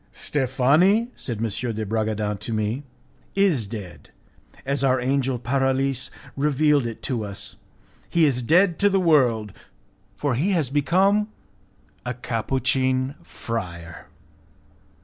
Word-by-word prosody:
"Steffani," 150 Hz, -, +2 dB
said 120 Hz, -4 st, -5 dB
M. 115 Hz, -, -1 dB, 0.3 s
de 110 Hz, 0 st, -3 dB
Bragadin 105 Hz, -1 st, -1 dB
to 115 Hz, -, -5 dB
me, 110 Hz, +4 st, -1 dB, 0.5 s
"is 175 Hz, -, +2 dB
dead, 100 Hz, -5 st, -8 dB, 0.6 s
as 140 Hz, +1 st, -1 dB
our 130 Hz, -1 st, +3 dB
angel 130 Hz, 0 st, 0 dB
Paralis 135 Hz, +2 st, 0 dB, 0.3 s
revealed 145 Hz, -1 st, +2 dB
it 115 Hz, -, -8 dB
to 120 Hz, -5 st, -2 dB
us; 100 Hz, -1 st, -7 dB, 0.5 s
he 170 Hz, -2 st, +4 dB
is 130 Hz, -4 st, +1 dB
dead 170 Hz, +7 st, +3 dB
to 205 Hz, -, +4 dB
the 195 Hz, -1 st, +2 dB
world, 125 Hz, -, +3 dB, 0.6 s
for 145 Hz, -3 st, -1 dB
he 165 Hz, -, +1 dB
has 155 Hz, -8 st, 0 dB
become 190 Hz, +8 st, +3 dB, 0.8 s
a 125 Hz, 0 st, -3 dB
Capuchin 130 Hz, +2 st, 0 dB
friar. 85 Hz, -7 st, -6 dB
130 Hz, 120 wpm, -24 LUFS, 115-150 Hz, 0.8 s, he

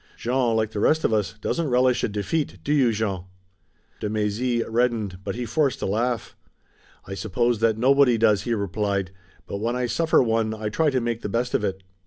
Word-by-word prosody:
Jean, 120 Hz, -1 st, +1 dB
like 110 Hz, -1 st, 0 dB
the 105 Hz, -, -4 dB
rest 160 Hz, +9 st, +3 dB
of -, -, +2 dB
us, 105 Hz, -1 st, 0 dB
doesn't 165 Hz, -3 st, -1 dB
relish 125 Hz, 0 st, +2 dB
a -, -, +2 dB
defeat, 105 Hz, +9 st, -2 dB
do 145 Hz, -, 0 dB
you, 135 Hz, -5 st, +4 dB
Jean?" 100 Hz, -4 st, -2 dB, 0.7 s
De 105 Hz, -, -3 dB
Mézy 110 Hz, +3 st, 0 dB
reddened, 115 Hz, -5 st, 0 dB
but 100 Hz, +1 st, -4 dB
he 120 Hz, 0 st, -3 dB
forced 140 Hz, +1 st, 0 dB
a -, -, -2 dB
laugh. 115 Hz, +4 st, -1 dB, 0.7 s
"I 95 Hz, -, -7 dB
suppose 115 Hz, +3 st, 0 dB
that 110 Hz, -1 st, +2 dB
nobody 130 Hz, 0 st, +4 dB
does!" 110 Hz, -3 st, +3 dB
he 115 Hz, +2 st, -1 dB
replied, 100 Hz, -1 st, -2 dB, 0.3 s
"but -, -, -5 dB
when 115 Hz, +4 st, -1 dB
I 125 Hz, 0 st, 0 dB
suffer 160 Hz, +6 st, +2 dB
one 110 Hz, -1 st, 0 dB
I 110 Hz, -1 st, -3 dB
try 155 Hz, +8 st, +2 dB
to 130 Hz, -2 st, +1 dB
make 115 Hz, -1 st, -2 dB
the 105 Hz, -, -4 dB
best 120 Hz, +4 st, -1 dB
of -, -, +1 dB
it." 95 Hz, -1 st, -3 dB
115 Hz, 205 wpm, -24 LUFS, 105-125 Hz, 0.7 s, you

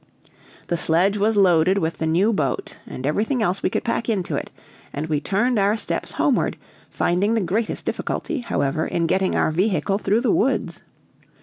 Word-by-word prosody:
The 170 Hz, -, -1 dB
sledge 175 Hz, +5 st, +2 dB
was 215 Hz, +1 st, +2 dB
loaded 185 Hz, -1 st, +4 dB
with 165 Hz, -3 st, -2 dB
the 160 Hz, -, -1 dB
new 185 Hz, +8 st, +2 dB
boat, 140 Hz, -9 st, -2 dB
and 130 Hz, -, -6 dB
everything 220 Hz, -, 0 dB
else 190 Hz, 0 st, 0 dB
we -, -, +1 dB
could -, -, -2 dB
pack 230 Hz, 0 st, -2 dB
into 195 Hz, -6 st, -1 dB
it, -, -, -4 dB, 0.4 s
and 145 Hz, +2 st, -4 dB
we 155 Hz, -2 st, -1 dB
turned 215 Hz, -, +1 dB
our 200 Hz, +3 st, +2 dB
steps -, -, -3 dB
homeward, -, -, +1 dB, 0.3 s
finding 200 Hz, +6 st, +1 dB
the 225 Hz, -, +1 dB
greatest 205 Hz, +5 st, -2 dB
difficulty, 315 Hz, -, -3 dB
however, 150 Hz, -, -1 dB
in 170 Hz, -, -1 dB
getting 190 Hz, +3 st, +1 dB
our -, -, +2 dB
vehicle 195 Hz, +3 st, 0 dB
through 215 Hz, +2 st, +1 dB
the 240 Hz, -4 st, +2 dB
woods. 265 Hz, +5 st, 0 dB
195 Hz, 180 wpm, -22 LUFS, 165-215 Hz, 0.4 s, loaded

